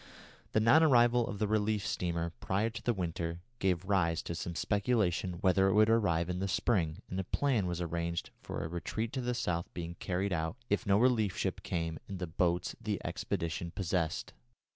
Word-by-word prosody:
The - - +4
non 115 +9 +6
arrival 120 -5 +5
of 105 - -4
the 105 +1 0
relief 105 -1 +1
steamer 85 -1 -1
prior 105 +4 0
to 120 0 -7
the 120 - +1
winter 85 -4 -3 0.2
gave 95 -3 +1
rise 90 -5 +1
to - - -4
some 85 +1 -4
speculation 100 -3 +1
whether 95 0 +4
it 95 - +3
would 110 +1 +6
arrive 85 -7 +2
in 90 0 -2
the 95 - -1
spring, 90 -3 0
and 95 - -4
a - - 0
plan 120 -2 +1
was 85 -1 -2
arranged 85 0 -2
for - - -5
a - - -2
retreat 100 +7 -3
to 130 - -1
the 125 0 -1
south 85 -7 -2
being 85 -1 -4
carried 95 +1 -1
out, 80 +5 -2
if 105 - +1
no 100 0 +5
relief 110 -4 +3
ship - - -1
came, 80 -3 -2
in 95 - -4
the 90 - -3
boats 90 +1 0
the - - -2
expedition 85 +1 -2
possessed. 85 -3 -2
95 Hz, 195 wpm, -32 LUFS, 85-110 Hz, 0.2 s, non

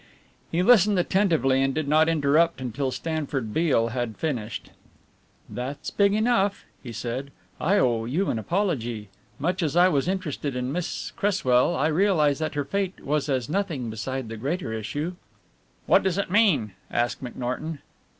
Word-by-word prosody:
He 170 +2 +1
listened 210 -2 +5
attentively 170 -8 +2
and 135 0 +1
did 155 -2 -1
not 155 +2 +4
interrupt 160 +1 +3
until 130 +2 -2
Stanford 140 -6 -3
Beale 145 -9 +2
had 120 -2 -3
finished. 120 -9 -4 0.8
"That's 130 +3 -5
big 200 0 +3
enough," 215 -3 +1 0.2
he 120 - -8
said. 125 +4 -4 0.3
"I 195 +6 +2
owe 115 - +2
you 165 +11 0
an 115 - -2
apology 120 - -2 0.3
much 180 +6 -1
as 155 -3 -1
I 180 +1 +6
was 140 -2 +1
interested 155 -7 -2
in 125 +1 -2
Miss 175 +3 -3
Cresswell, 170 -12 +2
I 140 - +1
realize 155 -3 +3
that 155 -2 -2
her 145 -1 -1
fate 195 +5 -2
was 145 0 0
as 130 -4 0
nothing 155 - -2
beside 130 +3 -4
the 115 0 -6
greater 140 +1 -3
issue." 145 - -3 0.7
"What - - +5
does 190 -1 0
it 200 -3 -2
mean?" 180 - +3 0.2
asked 120 +2 -1
McNorton. 125 +6 -4
145 Hz, 160 wpm, -25 LUFS, 125-180 Hz, 0.8 s, I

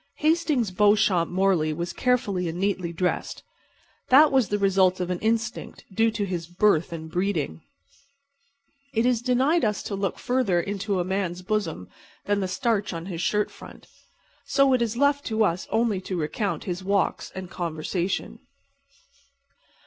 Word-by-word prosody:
Hastings 305 - +1
Beauchamp 205 -3 +3
Morley 180 -4 +1
was 170 +3 -4
carefully 205 -9 0
and 165 - -5
neatly 185 -3 -1
dressed. 180 +1 -2 0.7
That 290 +4 +7
was 260 -7 +2
the 205 - +1
result 190 -2 +3
of 180 0 -2
an 180 - -2
instinct 230 +2 -2
due 225 +3 +3
to 215 -2 -2
his 175 -3 -4
birth 175 -2 +2
and 160 -1 -6
breeding. 185 +5 -2 1.3
It 225 +2 +2
is 245 -2 +2
denied 260 +7 +2
us 210 -3 0
to 200 - -4
look 195 -1 -2
further 245 -8 +1
into 200 +1 -2
a - - +1
man's 185 -2 -2
bosom 185 - -2 0.4
than 205 0 +1
the 190 - -1
starch 210 0 -1
on 165 0 -5
his 175 -3 -5
shirt 210 +3 0
front; - - -13 0.6
so 275 -1 +3
it 250 - +2
is 235 0 -1
left 285 +1 +2
to 220 -1 +1
us 180 -3 -1
only 220 -4 +1
to 185 -1 -4
recount 185 +6 -2
his 185 -2 -4
walks 200 0 0
and 185 -1 -7
conversation. 170 +2 -3
200 Hz, 155 wpm, -25 LUFS, 180-230 Hz, 1.3 s, That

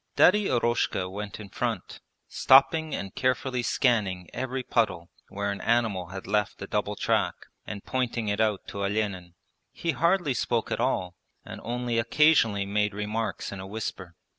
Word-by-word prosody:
Daddy 205 +3 +5
Eroshka 120 -6 +1
went 100 +1 -6
in 105 -2 -9
front, - - -3 0.3
stopping 155 +3 +4
and 95 -2 -5
carefully 130 0 0
scanning 105 -8 +1
every 130 +1 -3
puddle 95 -8 0 0.2
where 100 +1 -2
an 100 - -5
animal 110 -6 +1
had 95 +1 -8
left 105 0 0
a - - -3
double - - -1
track, - - +1 0.3
and 100 -2 -6
pointing 125 -3 -1
it 105 +1 0
out 105 -3 0
to 100 - -4
Olenin. 100 -4 -2 0.4
He 170 - -2
hardly 170 +1 +2
spoke 115 -1 -1
at - - -1
all 95 -8 0 0.3
and - - -8
only 120 0 -1
occasionally 115 -5 +4
made 105 0 0
remarks 105 +2 -3
in 100 - -6
a 95 - -7
whisper. 95 -4 -5
110 Hz, 160 wpm, -27 LUFS, 100-125 Hz, 0.4 s, Daddy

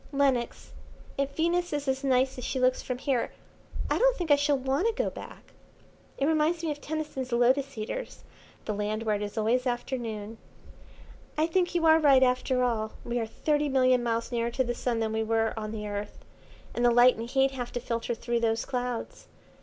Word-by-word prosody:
Lenox, 270 -4 0 0.4
if 275 0 -2
Venus 345 +2 +1
is 290 -1 -2
as 265 +1 0
nice 260 -1 +2
as - - -7
she 260 - -2
looks 255 0 +2
from 255 - -4
here 260 -2 -1 0.6
I - - 0
don't - - +4
think 345 -4 -2
I - - +9
shall 285 0 +2
want 270 - 0
to 460 - +1
go - - -1
back. - - -11 0.6
It 275 - +1
reminds 320 +2 +1
me 320 - 0
of 290 0 -6
Tennyson's 300 -4 -4
Lotus 260 +3 +2
Eaters, 220 - -5 0.4
'the 215 - -2
Land 210 +2 -2
where 215 -2 +1
it - - -7
is 205 +2 -5
always 240 +4 +1
afternoon.' 230 -3 -4 1.0
"I 310 - +3
think 350 +1 0
you 335 -1 +2
are 320 0 +7
right 275 -4 +6
after 250 0 +2
all. 220 -3 -1
We 240 0 -1
are 225 - -2
thirty 295 +5 0
million 255 -2 +3
miles 230 0 -1
nearer 235 -1 0
to 260 +2 0
the 240 -1 -2
Sun 235 -1 -1
than 220 -1 -1
we 220 - 0
were 225 0 +1
on 215 -1 -4
the 210 -1 -5
Earth, 205 0 -6 0.5
and 240 - -1
the 240 - +6
light 245 +1 +6
and 230 +1 -5
heat 270 +1 +3
have 245 -2 -5
to 245 - -1
filter 235 -1 -3
through 235 0 -1
those 225 -1 0
clouds. 250 -2 -4
255 Hz, 205 wpm, -28 LUFS, 230-280 Hz, 1.0 s, I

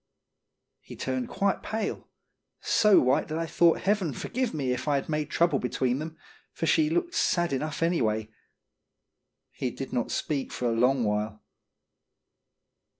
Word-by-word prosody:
He - - -12
turned 130 -2 -3
quite 200 -1 0
pale, 220 -2 -3 0.5
so 210 -2 +5
white 130 +5 +2
that 155 - -3
I 165 - -1
thought 170 0 +3
Heaven 195 -6 +1
forgive 255 - -2
me 135 -5 -2
if 125 +3 -3
I'd 140 -2 +1
made 150 -1 -2
trouble 170 -6 +2
between 125 +1 0
them, 160 +1 -6 0.3
for - - -3
she 310 -1 +3
looked 350 +2 0
sad 175 -4 +1
enough 150 +4 -2
anyway. 110 -10 0 1.2
He 130 - -3
did 135 +2 -7
not 120 - -1
speak 140 -3 -2
for 125 - -2
a - - +1
long 125 +2 +3
while. 105 0 -2
150 Hz, 150 wpm, -27 LUFS, 125-175 Hz, 1.2 s, so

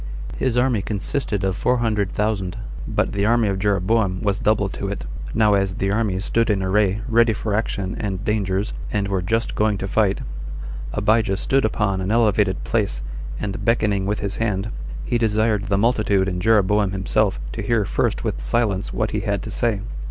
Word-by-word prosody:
His 125 -2 0
army 125 -4 +2
consisted 105 +1 -2
of 95 -1 0
four 125 +5 +1
hundred 105 -5 0
thousand, 100 -4 -1 0.3
but - - 0
the 100 +1 0
army 115 -1 +3
of 95 -1 -1
Jeroboam 100 0 +1
was 100 -2 +1
double 105 -2 +2
to 100 - -4
it. 100 -8 -4 0.3
Now 105 -1 +4
as 95 -1 +1
the 95 0 0
armies 100 -3 0
stood 115 0 +1
in 100 -2 +1
array, 100 +1 +2
ready 115 -1 +4
for 105 0 -3
action 100 -2 -1
and 100 0 -3
dangers, 100 -1 0 0.2
and 100 -2 0
were 95 -2 0
just 115 +6 0
going 105 -1 +1
to 95 - -4
fight, 100 0 +1 0.7
Abijah 105 -1 +2
stood 135 +5 +1
upon 100 -3 0
an 95 - -2
elevated 105 -4 +2
place, 100 - -1 0.4
and 100 0 -4
beckoning 105 -4 +1
with 105 +1 -1
his 100 0 -3
hand, 105 -2 -1 0.3
he 120 - 0
desired 110 -1 +1
the 100 -2 +1
multitude 105 -3 +2
and 90 -2 -2
Jeroboam 105 -1 +3
himself 95 -10 +1
to - - -4
hear 115 -4 +1
first - - 0
with - - -2
silence 95 - 0
what - - -1
he - - 0
had - - -1
to - - -6
say. 115 -4 0
105 Hz, 185 wpm, -22 LUFS, 95-110 Hz, 0.7 s, Now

